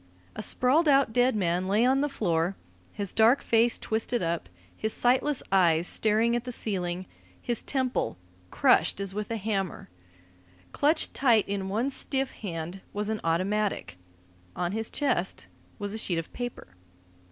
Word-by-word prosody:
A 215 - -4
sprawled 270 +9 +2
out 275 -5 +4
dead 250 0 +3
man 180 -2 0
lay 210 +5 +3
on 265 +2 +3
the 290 - 0
floor, 175 -8 0 0.4
his 200 -2 -3
dark 225 +5 +4
face 230 +1 +3
twisted 225 0 -1
up, 165 - -2 0.3
his 220 - -2
sightless 260 +3 +2
eyes 170 -4 +4
staring 220 +4 +2
at 240 - -1
the 250 - -5
ceiling, 185 -5 -2 0.3
his 240 -2 -1
temple 260 - -1 0.3
crushed - - +3
as 195 -1 -4
with 210 0 -4
a 230 - -2
hammer. 195 - -3 0.8
Clutched 305 +2 +2
tight 235 -6 +3
in 195 -1 -3
one 230 +8 0
stiff 270 0 -1
hand 175 -1 -6
was 210 +1 -2
an 220 -1 -2
automatic. 185 - -1 0.6
On 175 0 -1
his 220 +2 -2
chest 245 -11 -1 0.3
was 205 0 -4
a 220 - -3
sheet 175 -5 -1
of 165 - -5
paper. 245 - -6
215 Hz, 155 wpm, -27 LUFS, 185-245 Hz, 0.8 s, out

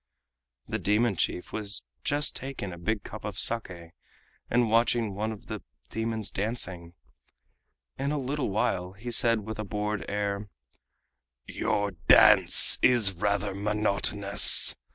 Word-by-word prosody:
The - - -4
demon 105 +1 0
chief 90 - -4
was 105 -1 -6 0.2
just 145 0 -2
taking 130 -8 -7
a 85 - -11
big 105 +4 -3
cup 110 - -10
of 105 -3 -7
SAKE 90 -9 -2 0.6
and 120 0 +1
watching 115 -1 0
one 110 +3 -4
of 110 - -11
the - - -8 0.3
demons 110 -1 -4
dancing. 95 -5 -4 1.0
In 140 +1 -2
a 150 - -2
little 140 0 -4
while 95 -4 -2
he 115 +5 -9
said 115 -1 +1
with 110 +1 -9
a - - -3
bored 105 0 -4
air: 100 0 -4 1.0
"Your 100 0 -3
dance 80 -4 +8
is 115 -6 +3
rather 100 +2 -2
monotonous. 100 0 0
105 Hz, 130 wpm, -26 LUFS, 100-115 Hz, 1.0 s, dance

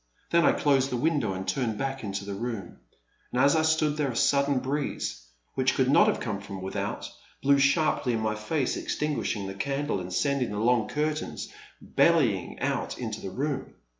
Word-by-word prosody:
Then 170 0 +4
I - - +5
closed 135 -2 +2
the 125 - -1
window 140 -7 +1
and 95 0 -5
turned 120 -6 -1
back 135 0 -3
into 100 -1 -4
the 100 - -4
room; 105 -3 -5 0.5
and 125 - -1
as 140 +4 +5
I 160 - +4
stood 155 -1 +2
there 145 -3 +1
a 120 - -4
sudden 140 +2 +3
breeze, 130 - -3 0.3
which 130 0 +1
could 130 0 +2
not - - +6
have - - +1
come 105 -4 -3
from 100 -1 -7
without, 95 - -3 0.4
blew 140 0 +5
sharply 140 -2 +2
in 115 - 0
my 110 -1 0
face, 125 +6 -1
exting^shing 145 -9 -2
the 95 - -5
candle 140 +2 -1
and 90 0 -6
sending 140 +5 +1
the 105 - -4
long 115 0 +2
curtains 150 - -2 0.4
bell3ang - - +2
out - - -1
into 110 -3 -4
the - - -5
room. 140 +7 -3
130 Hz, 190 wpm, -27 LUFS, 105-145 Hz, 0.5 s, not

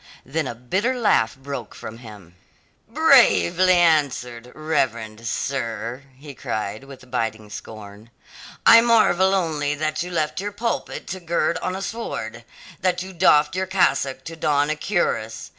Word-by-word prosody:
Then 155 +2 -2
a 120 - -5
bitter 190 - -1
laugh 160 - +2
broke 135 -4 -7
from 115 +1 -9
him. 105 -7 -13 0.5
"Bravely 180 - +4
answered, 135 -8 +1
reverend 115 -8 -2
sir," 120 0 -3 0.2
he 145 +1 -11
cried 110 0 -4
with 130 -2 -14
biting 110 -3 -3
scorn. 105 +1 -10 0.6
"I 230 - +9
marvel 205 -5 +4
only 150 -5 -1
that 155 +1 -2
you 180 - -4
left 160 0 -2
your 205 0 -4
pulpit 230 +3 -3
to 190 - -4
gird 170 -1 -1
on 185 - -3
a 195 - -5
sword; 120 - -5 0.4
that 180 0 0
you 190 0 -10
doffed 150 -2 +4
your 190 0 -1
cassock 140 -8 +1
to 165 - -8
don 145 -1 +1
a - - -1
cuirass. 130 - -2
145 Hz, 145 wpm, -22 LUFS, 115-180 Hz, 0.6 s, I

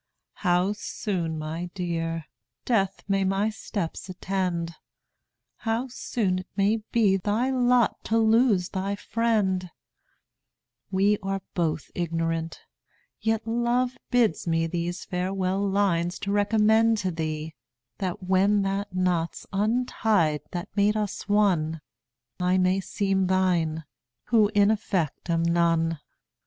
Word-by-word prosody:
How 180 +1 +2
soon, 180 -6 -3
my 160 +3 -4
Dear, 165 -3 -2 0.4
death 195 -5 +1
may 195 -1 +2
my 195 +3 +1
steps 200 -4 -5
attend, 180 -2 -2 0.8
How 230 +3 -2
soon't 185 -7 -2
may 205 +3 +3
be 205 -5 +4
thy 215 +7 0
lot 250 -2 +2
to 225 - +1
lose 220 -4 +3
thy 195 +1 -2
friend, 200 -5 0 1.2
We 200 +2 +2 0.3
both 160 -4 -1
are - - -31
ignorant, 165 -1 -2 0.6
yet 225 0 0
love 240 +2 +1
bids 230 -10 +2
me 165 0 +2
These 175 +2 -3
farewell 190 +2 -1
lines 180 -3 +1
to 200 - -2
recommend 220 +2 +3
to 190 -3 -1
thee, 155 -1 -4 0.5
That 185 -2 -3
when 195 +2 +3
the 195 +1 -1
knot's 180 -2 -1
untied 210 - +1
that 175 +1 -6
made 210 +1 +3
us 210 -1 -3
one, 175 -7 +2 0.6
I 180 +1 +2
may 185 +1 +3
seem 195 -1 0
thine, 175 -4 +1 0.5
who 220 -3 +5
in 205 +1 +5
effect 185 -7 -2
am 165 0 +2
none. 165 -1 +2
190 Hz, 120 wpm, -26 LUFS, 170-210 Hz, 1.2 s, who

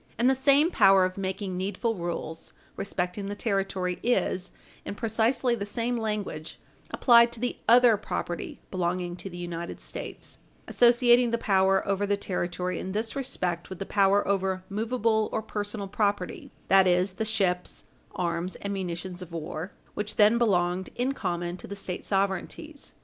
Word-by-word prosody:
And 235 +3 +3
the 265 - +5
same 280 +5 +4
power 195 - +6
of 185 0 -3
making 190 0 -3
needful 200 +5 -1
rules 170 -3 -5 0.2
respecting 195 0 -3
the 205 - -4
territory 195 -4 -1
is, 195 -6 0 0.3
in - - -5
precisely 230 +3 +1
the 220 -4 -2
same 230 +4 -1
language, 210 -8 -4 0.3
applied 235 -1 +5
to 235 - -6
the 245 +1 -2
other 240 -2 +7
property 175 -4 -4
belonging 175 -1 -1
to 195 - -7
the 175 - -9
United 170 -1 -5
States - - -7 0.3
associating 240 0 +5
the 235 - +1
power 190 -3 +2
over 200 +1 0
the 205 0 +1
territory 180 -2 -2
in 190 - -5
this 220 +4 -2
respect 180 - -2
with 190 - -7
the 195 - -5
power 200 0 +3
over 190 -1 0
movable 220 +1 0
or 220 - -2
personal 205 -1 -4
property 205 -2 -1 0.2
that 190 -1 +6
is, 180 +2 +3
the 190 - -3
ships, 195 -5 -1 0.3
arms, 170 0 -2
and 200 0 -4
munitions 180 -1 -4
of 180 -2 -9
war, 165 +2 -5 0.2
which 210 0 -4
then 215 +2 +5
belonged 180 -4 +1
in 250 +2 0
common 175 -5 -3
to - - -9
the 200 - -6
State 190 -2 -5
sovereignties. 200 +10 -2
195 Hz, 160 wpm, -27 LUFS, 180-225 Hz, 0.3 s, other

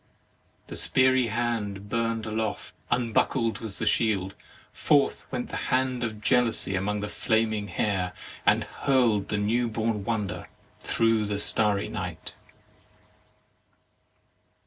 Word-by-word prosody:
The - - -10
speary 130 -2 +3
hand 105 -3 -2
burn'd 115 0 -1
aloft; 110 0 -3 0.2
unbuckled 115 0 +1
was 110 -4 -4
the 110 - -2
shield; 100 -3 +2 0.4
forth 145 -1 +2
went 125 -2 -3
the - - -4
hand 130 -1 +1
of 110 -2 -3
jealousy 115 -2 +2
among 105 +2 -1
the 105 - -3
flam 110 +1 +1
ing 105 -1 -3
hair, 95 -4 -1 0.3
and - - +4
hurl'd 115 -7 +1
the 105 - 0
new 115 +4 +1
born 110 -2 -1
wonder 105 -4 -3 0.3
through 115 -2 +2
the 100 0 -1
starry 105 -1 +1
night. - - -6
110 Hz, 125 wpm, -27 LUFS, 105-120 Hz, 0.4 s, and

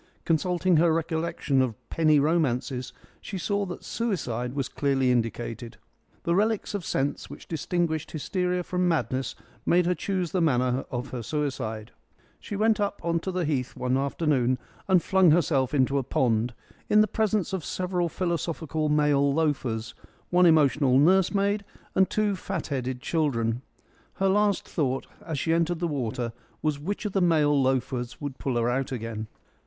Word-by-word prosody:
Consulting 175 +1 +2
her 165 +1 +4
recollection 160 -4 0
of 125 -4 0 0.2
penny 155 -2 +4
romances 135 -5 0 0.3
she 195 - -5
saw 200 +2 -1
that 175 - -7
suicide 125 - -2
was 135 -3 -1
clearly 135 -3 +1
indicated. 115 -1 -2 0.5
The 170 - +1
relics 210 +3 +1
of 200 -3 -3
sense 140 -2 -2
which - - -11
distinguish 160 -1 -1
hysteria 180 +3 -1
from 180 0 0
madness 130 -6 -1 0.3
made 175 0 +3
her 180 - +2
choose 180 0 -2
the 185 - +1
manner 130 -4 +1
of 125 +2 -4
her 125 - -5
suicide. 115 -6 -3 0.5
She 205 - -6
went 215 +2 +2
up 205 0 -1
on 170 0 +1
to 190 - -4
the 180 -2 -1
Heath 135 -4 -1
one 125 0 0
afternoon 135 -2 +1 0.3
and 185 -3 +4
flung 190 -3 +4
herself 145 -5 +3
into 140 0 +2
a - - -2
pond, 120 -2 +1 0.3
in 210 - +6
the 215 - +3
presence 210 -2 0
of 190 -4 -2
several 180 0 -1
philosophical 165 -3 -2
male 145 -2 +3
loafers, 135 -7 -1 0.4
one 180 0 +6
emotional 145 -4 +4
nursemaid, 195 +6 +3 0.3
and 190 0 +3
two 210 -2 +1
fat 190 -2 -4
headed 130 -2 -3
children. 125 -8 0 0.5
Her 195 0 +1
last 205 0 +2
thought 135 -4 -1 0.2
as 160 -3 -4
she 160 +4 +1
entered 170 +1 +1
the 170 +1 -1
water 120 -5 -2 0.3
was 155 -2 0
which 200 +9 -4
of 210 - -1
the 195 - +2
male 150 -5 +3
loafers 125 -2 -1
would 145 -3 -6
pull 130 -3 -2
her 120 0 +1
out 130 +2 -1
again. 115 -3 -4
155 Hz, 160 wpm, -26 LUFS, 130-180 Hz, 0.5 s, in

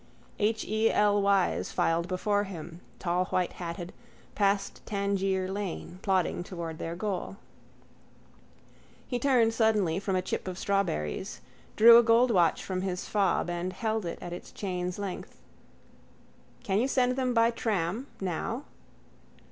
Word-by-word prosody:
H. 220 +1 +1
E. 220 +1 +2
L. 205 -1 +3
Y.'S 200 -2 +2
filed 170 +1 +1
before 205 +3 0
him, 170 -2 -8 0.2
tallwhitehatted, 175 -1 -2 0.4
past 200 -1 0
Tangier 195 -2 0
lane, 190 -2 -5
plodding 185 -3 +1
towards 170 -3 -6
their 165 +1 -4
goal. 195 0 -3 1.7
He 245 - -2
turned 240 -4 +3
suddenly 210 -7 +2
from 195 -1 -1
a 185 - 0
chip 185 - -3
of 185 -1 -4
strawberries, 185 - -1 0.4
drew 230 +2 +9
a - - +4
gold 235 +2 +4
watch 175 -6 +3
from 185 -1 -3
his 185 -1 -3
fob 200 -4 +1
and 175 +1 -3
held 220 -2 -2
it 170 - -4
at 175 - -5
its 175 - -9
chain's 180 -2 -3
length. 200 -2 -6 1.2
—Can 195 0 +1
you 250 - +2
send 255 -2 +2
them 255 -2 0
by 230 0 +4
tram? 220 +1 -2
Now? 195 - -3
195 Hz, 135 wpm, -29 LUFS, 180-220 Hz, 1.7 s, drew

